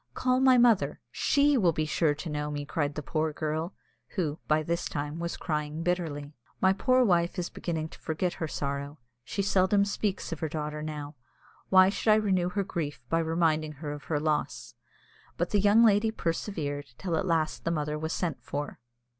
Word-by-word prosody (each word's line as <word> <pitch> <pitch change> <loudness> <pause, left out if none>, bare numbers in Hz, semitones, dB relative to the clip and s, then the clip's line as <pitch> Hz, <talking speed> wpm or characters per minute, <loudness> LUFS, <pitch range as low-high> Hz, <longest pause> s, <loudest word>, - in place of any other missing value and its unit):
"Call 255 0 +2
my 260 -1 +6
mother, 235 -4 +4
she 285 -2 +3
will 175 -5 +3
be 155 0 0
sure 155 -1 +1
to 165 - -7
know 150 -1 -2
me," 145 -1 -4
said 145 -4 0
the 150 - -4
poor 155 +1 -1
girl, 155 +4 -3 0.4
who, 160 -5 -1
by 155 0 +3
this 170 +2 -1
time, 145 +2 -4
was 170 0 -3
crying 150 0 -3
bitterly. 160 -5 -2 0.3
"My 190 0 +4
poor 255 +5 +3
wife 175 -2 +2
is 175 -1 -3
beginning 160 -2 -3
to - - -14
forget 170 +3 -1
her 160 - 0
sorrow. 140 0 -4 0.3
She 200 - -2
seldom 200 +1 +3
speaks 200 -2 -2
of 165 - -4
her 160 - -2
daughter 150 0 -4
now. 150 -1 -5 0.6
Why 185 0 +7
should 205 +2 -1
I - - +7
renew 190 -5 +2
her 200 +2 -1
grief 155 -6 -4
by 165 - +2
reminding 160 -2 +1
her 145 +1 -6
of 145 0 -7
her 150 -3 0
loss?" 150 0 -2 0.6
But - - -1
the 205 - +3
young 205 +3 +6
lady 215 0 +4
persevered, 165 -7 -3
till 180 -4 -2
at 185 +4 -1
last 160 -2 0
the - - 0
mother 150 -2 -1
was 160 +1 -3
sent 165 -5 -2
for. 145 +1 -5
165 Hz, 195 wpm, -29 LUFS, 150-190 Hz, 0.6 s, Why